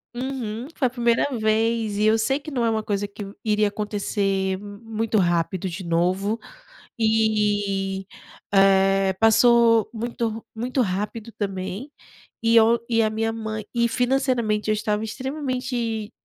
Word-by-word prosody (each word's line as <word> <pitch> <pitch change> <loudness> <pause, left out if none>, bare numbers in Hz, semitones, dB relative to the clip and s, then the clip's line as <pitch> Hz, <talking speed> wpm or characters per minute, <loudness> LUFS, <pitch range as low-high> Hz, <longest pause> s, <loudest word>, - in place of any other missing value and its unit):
Uhum. 250 -2 -4
Foi 260 - +2
a - - -3
primeira 235 0 +1
vez 220 0 +1
e 210 - +2
eu 220 +1 +4
sei 270 +6 +1
que 305 - -9
não 250 -5 -1
é - - +3
uma 220 -1 0
coisa 205 -1 -2
que 200 +1 -11 0.2
iria 210 -1 +2
acontecer 200 -2 -1
muito 215 +2 -3
rápido 175 +1 0
de 180 +2 -6
novo, 185 +6 0 0.6
eh 205 -3 +1 1.0
eh, - - 0
passou 230 0 +5
muito 230 -1 -3
muito 250 +4 -1
rápido 210 +2 -3
também, 195 +5 -4 0.5
e 230 0 +4
eu 230 +1 +5
e 230 -1 +3
a 215 - +2
minha 225 +1 -1
mãe 215 -1 -4
e 235 -1 +2
financeiramente 245 -4 0
eu - - +4
estava 210 0 -1
extremamente 250 -3 -3
220 Hz, 140 wpm, -23 LUFS, 205-235 Hz, 1.0 s, passou